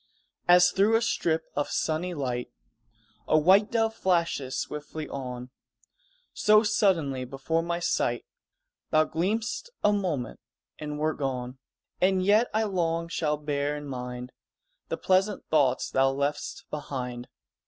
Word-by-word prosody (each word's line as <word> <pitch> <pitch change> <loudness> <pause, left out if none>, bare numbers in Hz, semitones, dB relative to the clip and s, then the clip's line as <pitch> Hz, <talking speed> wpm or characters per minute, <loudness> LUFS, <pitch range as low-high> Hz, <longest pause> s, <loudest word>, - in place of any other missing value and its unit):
_ - - -39 0.4
As 180 0 +7
through 205 +4 +3
a 225 - +3
strip 165 -7 0
of 145 - -1
sunny 170 +3 -1
light 125 -4 -3 0.8
A 155 - +4
white 190 +7 +5
dove 225 -1 +1
flashes 170 -9 0
swiftly 150 +1 -5
on, 125 -2 -6 0.8
So 215 +1 +5
suddenly 170 - +1
before 135 +6 -1
my 170 +1 -2
sight 120 -7 0 0.6
Thou 155 - +4
gleamed'st 215 - -2
a 210 - +4
moment 165 - -2 0.4
and 150 -1 -5
wert 155 +1 -1
gone; 130 -2 -3 0.4
And 185 0 +3
yet 215 +4 +4
I 220 +1 +1
long 170 -4 -1
shall 150 -3 0
bear 145 0 -1
in 145 - -7
mind 125 -2 -6 0.6
The - - -3
pleasant 190 +2 +1
thoughts 140 -5 +2
thou 135 0 +3
left'st 140 +2 -3
behind. 125 -4 -5
155 Hz, 135 wpm, -27 LUFS, 135-185 Hz, 0.8 s, As